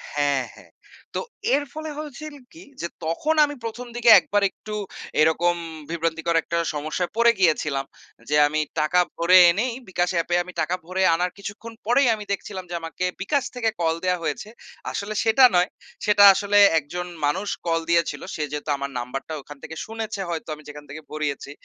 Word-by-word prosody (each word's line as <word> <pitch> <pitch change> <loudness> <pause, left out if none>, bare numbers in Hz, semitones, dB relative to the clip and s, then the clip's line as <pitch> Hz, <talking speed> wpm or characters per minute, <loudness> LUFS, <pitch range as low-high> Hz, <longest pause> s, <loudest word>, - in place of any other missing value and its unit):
হ্যাঁ, 145 -2 +1
হ্যাঁ। - - -17 0.4
তো - - 0 0.4
এর 290 - 0
ফলে 310 0 -5
হয়েছিল 305 0 -7 0.2
কি? 330 +2 -13 0.2
যে 170 - -2 0.2
তখন 230 - 0
আমি 290 0 -6
১ম 235 +2 -6
দিকে 240 0 +3
একবার 205 0 0
একটু 215 - -10 0.5
এরকম 170 +2 +3 0.3
বিভ্রান্তিকর 165 0 -1
একটা 170 - -2 0.2
সমস্যায় 155 +4 -2
পড়ে 235 0 +6
গিয়েছিলাম। 150 -6 +1 0.4
যে 150 - +2
আমি 155 +1 -1 0.2
টাকা 155 +4 +2 0.2
ভরে 175 +2 +5
এনেই 230 +7 -1 0.2
বিকাশ 175 -1 0
অ্যাপে 170 +1 +1
আমি 180 +1 -11
টাকা 180 - 0
ভরে 185 +2 -1
আনার 180 +2 -1
কিছুক্ষণ 205 +3 -8
পরেই 245 +4 +4
আমি 210 - -8
দেখছিলাম 195 -1 -4
যে 175 - -4
আমাকে 165 +2 -4 0.2
বিকাশ 275 +7 +1
থেকে 235 -2 +1
কল 165 -1 +2
দেয়া 180 0 +1
হয়েছে। 160 +7 -3 0.4
আসলে 205 +1 -4
সেটা 225 +4 +4
নয়। 180 +1 +3 0.4
সেটা 205 -1 +5
আসলে 200 +1 +1 0.2
একজন 175 +4 -6 0.2
মানুষ 185 +8 -1 0.2
কল 165 0 +1
দিয়েছিল। 170 -1 +1
সে 155 - -2
যেহেতু 150 +1 -5
আমার 140 0 -4
নাম্বারটা 130 +5 -5
ওখান 145 +1 -12
থেকে 160 - -8
শুনেছে 220 -2 -5
হয়তো 165 -1 -4
আমি 150 - -16
যেখান 150 0 -10
থেকে 150 +3 -8
ভরিয়েছি। 150 -2 -3
175 Hz, 175 wpm, -23 LUFS, 155-215 Hz, 0.5 s, পড়ে